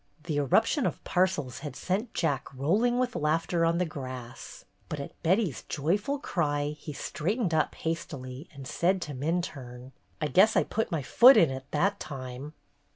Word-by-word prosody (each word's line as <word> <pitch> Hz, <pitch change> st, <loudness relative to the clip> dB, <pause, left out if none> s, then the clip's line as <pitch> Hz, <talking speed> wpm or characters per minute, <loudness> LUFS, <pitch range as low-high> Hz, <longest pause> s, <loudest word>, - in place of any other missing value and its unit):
The 155 Hz, -3 st, -2 dB
eruption 220 Hz, -, +3 dB
of -, -, -5 dB
parcels 180 Hz, -9 st, 0 dB
had 145 Hz, -3 st, -7 dB
sent 205 Hz, -, -2 dB
Jack 140 Hz, -6 st, -1 dB
roll 160 Hz, -, +1 dB
ing 245 Hz, 0 st, +2 dB
with 250 Hz, 0 st, 0 dB
laughter 165 Hz, +3 st, +1 dB
on 165 Hz, +1 st, +2 dB
the 180 Hz, -, +1 dB
grass, 130 Hz, -5 st, -8 dB, 0.2 s
but 150 Hz, -, -4 dB
at 140 Hz, -, -8 dB
Betty's 180 Hz, -, +1 dB
joyful 205 Hz, -, 0 dB
cry 145 Hz, -, -1 dB
he 150 Hz, -, -7 dB
straightened 175 Hz, -, -2 dB
up 155 Hz, -1 st, +1 dB
hastily 145 Hz, -4 st, -5 dB
and 140 Hz, -4 st, -10 dB
said 185 Hz, +7 st, +1 dB
to 145 Hz, -, -6 dB
Minturne: 135 Hz, -4 st, -4 dB, 0.3 s
"I 155 Hz, -, -1 dB
guess 190 Hz, +8 st, +5 dB
I -, -, +4 dB
put 225 Hz, -1 st, -2 dB
my 160 Hz, -4 st, -1 dB
foot 250 Hz, -, +8 dB
in 160 Hz, -5 st, +5 dB
it 130 Hz, 0 st, -6 dB
that 200 Hz, +7 st, +1 dB
time!" 130 Hz, +1 st, -7 dB
155 Hz, 170 wpm, -28 LUFS, 140-185 Hz, 0.3 s, foot